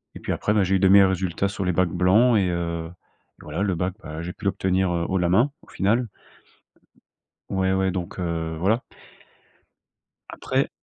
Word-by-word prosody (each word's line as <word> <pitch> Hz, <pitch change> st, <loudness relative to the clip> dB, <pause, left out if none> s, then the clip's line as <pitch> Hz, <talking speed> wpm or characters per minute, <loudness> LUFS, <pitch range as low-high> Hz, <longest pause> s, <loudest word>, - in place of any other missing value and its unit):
Et -, -, -8 dB
puis -, -, -4 dB
après, 105 Hz, -, 0 dB
bah, 105 Hz, -, +3 dB
j'ai 95 Hz, +1 st, +1 dB
eu -, -, +2 dB
de 95 Hz, -, +4 dB
meilleurs 100 Hz, 0 st, +7 dB
résultats 95 Hz, +1 st, -1 dB
sur 95 Hz, -1 st, -4 dB
les 90 Hz, -, +1 dB
bacs 90 Hz, +1 st, +2 dB
blancs 100 Hz, +7 st, +4 dB
et 95 Hz, -, +2 dB
heu, 85 Hz, -1 st, -3 dB, 0.5 s
voilà -, -, -5 dB
le 95 Hz, -3 st, 0 dB
bac, 90 Hz, +2 st, -2 dB
bah, 80 Hz, +1 st, -7 dB
j'ai 90 Hz, +1 st, -5 dB
pu 105 Hz, -, -13 dB
l'obtenir, 95 Hz, -1 st, +1 dB
heu, 85 Hz, 0 st, -1 dB
haut 95 Hz, -, +1 dB
la 90 Hz, -1 st, +1 dB
main, 115 Hz, +10 st, +3 dB
au -, -, -20 dB
final. 115 Hz, +5 st, 0 dB, 1.4 s
Ouais, 95 Hz, -1 st, 0 dB
ouais, 95 Hz, 0 st, +1 dB
donc, 90 Hz, 0 st, -5 dB
heu, 80 Hz, -2 st, -3 dB
voilà. 110 Hz, +8 st, +1 dB, 1.5 s
Après -, -, -1 dB
95 Hz, 190 wpm, -24 LUFS, 85-100 Hz, 1.5 s, meilleurs